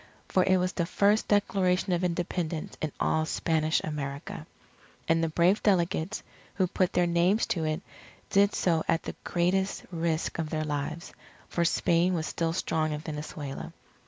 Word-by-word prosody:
For 185 - +3
it 190 0 +4
was 180 0 0
the 170 -2 -1
first 205 +3 +3
Declaration 190 -3 +2
of 175 +1 0
Independence 170 -2 -2
in 155 - -1
all 160 - +2
Spanish 160 -2 +1
America. 140 -2 -5 0.6
And 165 0 +3
the 165 - +1
brave 175 +6 +3
delegates, 185 -1 +1 0.3
who 190 - +2
put 180 0 0
their 175 - +3
names 175 +5 +3
to 165 -3 -2
it, 155 +3 -2 0.5
did 200 +1 +4
so 165 -3 +2
at 165 - +1
the - - -5
greatest 185 +3 0
risk 165 -1 -1
of 160 -2 -2
their 155 0 -1
lives; 150 +2 -4 0.4
for 170 - 0
Spain 170 +2 +2
was 160 -2 -1
still 165 +1 -1
strong 160 -3 0
in 150 - -4
Venezuela. 150 -2 -6
170 Hz, 160 wpm, -28 LUFS, 155-185 Hz, 0.6 s, it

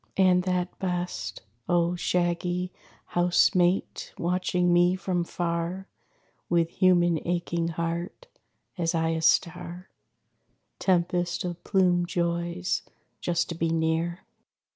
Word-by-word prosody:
And 185 -1 +5
that 180 -1 -1
best, 180 -1 -3 0.3
O 175 0 +2
shaggy 175 +1 -1 0.3
house 175 0 +3
mate, 180 +1 0
watching 180 0 +1
me 175 +1 +4
from 180 -1 -1
far, 170 +2 -3 0.6
With 170 -1 +2
human 175 -3 +3
aching 170 -1 -1
heart, 170 - -4 0.5
as 165 0 0
I 165 0 +1
a 165 0 -1
star 175 +2 0 0.9
Tempest 175 -1 +1
of 175 -1 -5
plumèd 180 -3 +2
joys, 170 +1 -1 0.4
just 170 -1 0
to - - -2
be 165 0 -1
near! 165 +2 -1
175 Hz, 110 wpm, -27 LUFS, 170-180 Hz, 0.9 s, And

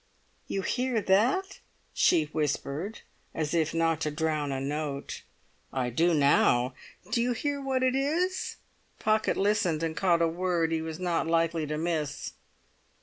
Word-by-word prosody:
"You 195 - -2
hear 250 +1 0
that?" 245 - +2 0.3
she 165 -3 +4
whispered, 150 - -3 0.3
as 155 -1 -2
if 160 -2 +2
not 165 -1 +1
to 155 - 0
drown 155 -1 -1
a 135 - -2
note. 140 0 -4 0.5
"I 125 -2 -1
do 165 +7 +3
now." 135 -3 +3 0.4
"Do 235 0 +2
you 245 +1 +1
hear 285 +4 -2
what 265 -1 0
it 255 0 +3
is?" 330 +7 0 0.4
Pocket 215 0 +1
listened, 195 -6 +1
and 160 -1 -2
caught 170 -3 +3
a - - +4
word 170 -1 0
he 160 -1 0
was 160 -1 -5
not 175 -3 0
likely 165 -1 +1
to 150 +1 -2
miss. 155 -3 -2
165 Hz, 150 wpm, -28 LUFS, 155-215 Hz, 0.5 s, she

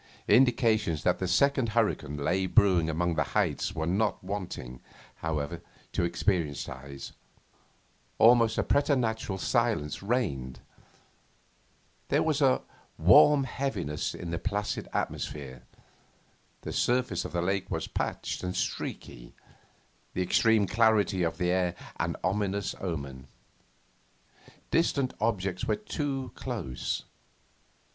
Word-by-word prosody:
Indications 115 - +3
that 90 - +2
the 95 - -1
second 130 +5 +3
hurricane 105 - +1
lay 90 +6 0
brewing 95 -6 +4
among 85 +2 0
the 80 - +1
heights - - 0
were 80 - -1
not 100 +4 0
wanting, 90 -11 -5 0.4
however, 80 +1 -3 0.3
to - - 0
experienced 85 -4 0
eyes. 70 +1 -8 1.1
Almost 115 -1 +5
a - - +2
preternatural 125 -8 +1
silence 110 - 0
reigned; 80 - -1 1.5
there - - +2
was 155 -2 0
a 130 -2 +3 0.3
warm 145 -2 +7
heaviness 110 - -3
in 85 - -6
the 85 - -2
placid 105 +1 -2
atmosphere; 65 -4 -4 1.0
the - - -6
surface 120 -8 +1
of - - -6
the 85 - 0
lake 95 +1 -1
was - - -2
patched - - -3
and 90 0 -3
streaky; - - -4 0.8
the 90 - +1
extreme 110 +3 +3
clarity 110 -2 +3
of 85 -1 0
the 90 -1 +1
air 90 -1 +1 0.2
an - - -1
ominous 100 +1 0
omen. 70 -7 -5 1.4
Distant 140 -5 +1
objects 95 -5 -1
were - - +1
too 145 -10 -3
close. 105 - -4
95 Hz, 115 wpm, -29 LUFS, 80-115 Hz, 1.5 s, warm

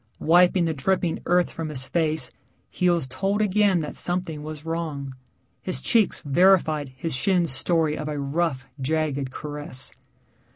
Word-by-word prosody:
Wiping 175 +2 +4
the 160 - 0
dripping 170 +4 0
earth 180 0 +2
from 165 -1 -5
his 135 -4 -4
face, 155 +1 0 0.4
he 180 - +1
was 170 -6 +1
told 195 +11 -1
again 205 -3 +3
that 150 - -6
something 175 -4 0
was 155 0 -8
wrong. 155 -5 -4 0.5
His 185 - -2
cheeks 225 -5 +2
verified 155 -2 +3
his 160 +1 0
shin's 175 +2 +2
story 155 +2 +1
of 150 - -5
a 150 -1 -3
rough, 140 -1 -1 0.2
jagged 140 -1 -1
caress. 145 -2 -6
160 Hz, 150 wpm, -24 LUFS, 145-180 Hz, 0.5 s, Wiping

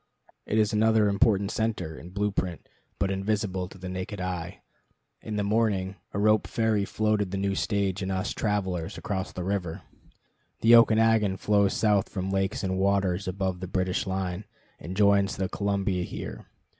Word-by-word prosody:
It 110 - 0
is 105 -1 +2
another 110 0 +4
important 100 0 +2
center, 110 -9 -2
in 85 - -10
blue 105 +2 -1
print, 90 -4 -3 0.3
but 95 0 0
invisible 95 -2 -1
to 95 - -13
the 95 0 -7
naked 95 +2 -5
eye. 90 -1 -4 0.6
In 110 - -5
the 105 - 0
morning, 100 -3 +1 0.2
a - - -4
rope 105 +1 +3
ferry 110 -3 +1
floated 105 -2 0
the 100 - -3
new 100 0 0
stage 100 -1 -1
and 95 0 -2
us 95 0 -1
travelers 95 -3 -2
across 95 -1 -3
the 90 - -5
river. 90 -2 -3 0.8
The 115 +1 +7
Okanagon 110 -3 +4
flows 100 -1 +2
south 105 -3 +2
from 95 -1 -3
lakes 95 +1 -1
and 95 0 -1
waters 95 -1 +1
above 95 -1 -2
the 95 - -5
British 95 +1 -1
line, 95 +1 -3 0.3
and 90 +3 -7
joins 100 -1 +4
the 95 -1 -1
Columbia 100 -2 -1
here. - - -7
100 Hz, 170 wpm, -27 LUFS, 95-105 Hz, 0.8 s, The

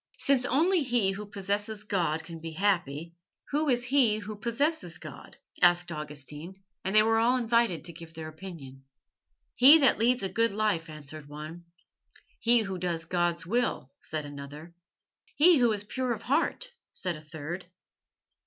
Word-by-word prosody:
"Since 270 -3 +2
only 330 +8 +3
he 240 -7 +1
who 205 +1 -6
possesses 205 +1 -2
God 170 -6 -1
can 165 0 -9
be 165 0 -7
happy, 170 -4 -1 0.4
who 300 +1 +1
is 245 -1 +2
he 250 -5 +3
who 215 0 -6
possesses 235 - 0
God?" 145 -4 -11 0.2
asked 175 0 +4
Augustine, 150 +2 -7 0.3
and 190 +2 -2
they 215 - +7
were 225 +1 +2
all 245 +3 +3
invited 230 -8 +1
to 170 - -5
give 165 0 -12
their 160 -1 -6
opinion. 155 -6 -10 0.7
"He 275 +6 +9
that 275 -8 +3
leads 245 0 +2
a - - +1
good 230 +3 +1
life," 205 -6 0
answered 150 -1 -9
one. 155 +4 -9 0.7
"He 235 0 +4
who 195 -3 -5
does 170 -2 -2
God's 175 0 -1
will," 215 - -1
said 155 -1 -3
another. 145 +3 -9 0.6
"He 330 0 +6
who 240 -2 +4
is 205 -1 -2
pure 250 +3 -2
of 225 - -8
heart," - - 0 0.2
said 185 -3 -1
a 155 - -10
third. 160 +4 -7
190 Hz, 160 wpm, -28 LUFS, 160-235 Hz, 0.7 s, He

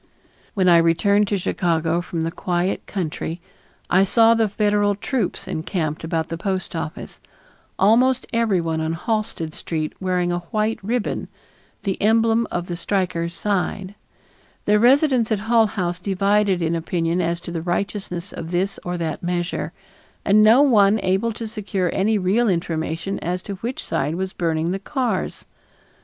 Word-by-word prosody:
When 190 -2 +2
I 170 -1 +7
returned 200 +5 +3
to 200 - 0
Chicago 170 -2 0
from 170 -1 -4
the 165 +1 -1
quiet 175 +2 -2
country 170 -2 -4 0.5
I 185 +2 +4
saw 225 +3 +5
the 225 -2 +2
Federal 205 0 +2
troops 215 0 -2
encamped 160 -1 -3
about 160 0 -2
the 165 - -4
post 190 -2 -3
office; 160 -1 -6 0.6
almost 250 +6 +4
everyone 180 -9 +1
on 160 +1 -1
Halsted 175 -4 -2
Street 155 -3 -3
wearing 180 -2 0
a 175 - 0
white 215 +1 0
ribbon, 230 +2 -2 0.6
the 195 -2 -2
emblem 225 +2 +3
of 175 0 -3
the 175 - -4
strikers' 170 -2 -1
side; 195 0 -2 0.7
the 210 0 +4
residents 255 -1 +4
at 210 -2 +1
Hull 225 0 +3
House 180 -4 -2
divided 195 0 +1
in 165 0 0
opinion 165 +1 -1
as 170 0 -1
to 170 - -7
the 165 -1 -3
righteousness 180 +1 -3
of 165 - -6
this 185 +3 -1
or 175 0 -3
that 160 -3 -3
measure; 175 0 -2 0.5
and 210 +2 +5
no 225 +6 +7
one 215 -6 +5
able 190 +5 +1
to 225 +1 -6
secure 200 -4 -2
any 215 +3 +2
real 205 +5 +2
information 170 +1 -2
as 180 +1 -3
to 200 - -5
which 240 +6 -4
side 145 +4 -1
was 190 +1 -3
burning 165 -1 -1
the 195 - -2
cars. 255 +3 -2
190 Hz, 155 wpm, -22 LUFS, 170-210 Hz, 0.7 s, I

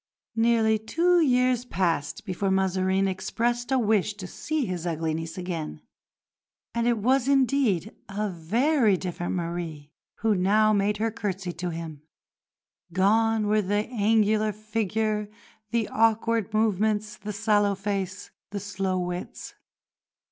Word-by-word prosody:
Nearly 225 -1 +3
two 345 +11 +2
years 250 -3 +3
passed 170 - -1
before 195 0 -1
Mazarin 190 0 +1
expressed 240 +6 -1
a 265 - +4
wish 210 -3 +1
to 200 -3 -7
see 300 +9 -2
his 180 -3 -4
ugly 160 -1 -1
niece 165 +1 -5
again; 170 - -5 0.9
and 235 0 0
it 240 -1 +2
was 255 +4 +2
indeed 260 - +2
a 210 +2 -2
very 215 - +2
different 175 -1 -3
Marie 165 -4 -4 0.3
who 220 0 +3
now 210 +3 +3
made 205 +1 +1
her 225 +2 0
curtsy 195 -4 -4
to 175 +1 -4
him. 165 -3 -6 0.9
Gone 215 +4 +3
were 210 +1 +3
the 205 +2 0
angular 215 -1 +2
figure, 215 0 -2 0.4
the 230 -1 0
awkward 225 -1 +2
movements, 215 0 +1
the 210 +1 -6
sallow 205 -1 +2
face, 195 -1 -4 0.2
the 200 +1 -4
slow 195 -1 -2
wits. 180 0 -5
210 Hz, 130 wpm, -26 LUFS, 185-225 Hz, 0.9 s, a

